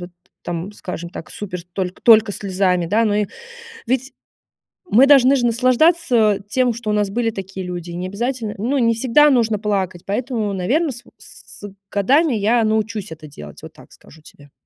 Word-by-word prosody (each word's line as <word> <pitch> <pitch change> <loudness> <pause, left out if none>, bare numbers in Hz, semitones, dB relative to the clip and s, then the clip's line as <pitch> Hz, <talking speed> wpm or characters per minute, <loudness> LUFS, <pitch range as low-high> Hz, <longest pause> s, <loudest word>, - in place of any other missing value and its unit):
вот 175 0 -9 0.3
там, 175 +4 -5
скажем 175 -4 -7
так, 165 - -9
супер 180 -4 -6
только 185 -1 -4
только 220 -2 +6
слезами, 185 -3 0
да. 220 +6 +2
Ну 205 -1 +1
и 210 0 +1 0.6
ведь 260 +2 -1 0.8
мы 255 +6 +6
должны 275 -1 +6
же 240 -2 +1
наслаждаться 245 - +2
тем, 250 0 +1
что 220 -2 -5
у - - +1
нас 210 -1 +1
были 230 +1 -1
такие 195 -2 -7
люди, 175 -1 -6
и 170 - -7
необязательно 215 +5 -4
ну, 260 +7 -1
не 230 -2 +2
всегда 265 +6 +4
нужно 225 -5 +2
плакать, 190 -4 -2
поэтому, 220 -1 -2
наверно, 270 - 0
с 240 - -11
в - - -20
с - - -14
с 205 -1 -8 0.2
годами 270 - +2
я 225 +3 +2
научусь 215 -3 -2
это 155 -1 -11
делать. 75 - -12
Вот - - -11
так - - -18
скажу 160 - -18
тебе. 145 -2 -18
215 Hz, 185 wpm, -19 LUFS, 190-245 Hz, 0.8 s, только